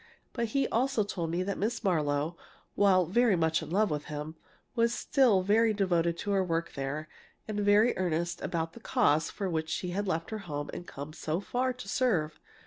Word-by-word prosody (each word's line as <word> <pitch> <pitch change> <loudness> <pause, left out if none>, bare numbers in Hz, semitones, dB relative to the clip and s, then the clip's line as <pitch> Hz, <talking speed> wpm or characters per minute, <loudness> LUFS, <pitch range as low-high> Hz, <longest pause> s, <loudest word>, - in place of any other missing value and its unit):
But 235 -2 -1
he 275 - +3
also 250 -1 +1
told 175 -5 -3
me 175 +2 0
that 200 0 -3
Miss 225 +3 -1
Marlowe, 155 -3 +1 0.4
while 190 -3 +4
very 225 +4 +3
much 160 -2 +1
in - - -7
love 205 +3 +2
with 150 -1 -2
him, 150 +1 -5 0.4
was 235 0 +2
still 240 -10 +3
very 220 +3 +3
devoted 170 -4 +1
to 205 - -3
her 195 -1 +3
work 170 -2 -2
there 140 +3 -4 0.4
and 210 -1 -3
very 205 +3 +4
earnest 170 -1 -1
about 165 -1 -2
the - - -11
cause 215 - +2
for 200 - -4
which 160 -2 -2
she 180 +2 -2
had 200 +3 -2
left 165 +1 -2
her 220 - -3
home 145 0 -4
and 175 - -7
come 145 +2 -7
so 160 0 -2
far 250 +5 -1
to 250 -5 -10
serve. 190 -10 0
185 Hz, 200 wpm, -30 LUFS, 160-215 Hz, 0.4 s, while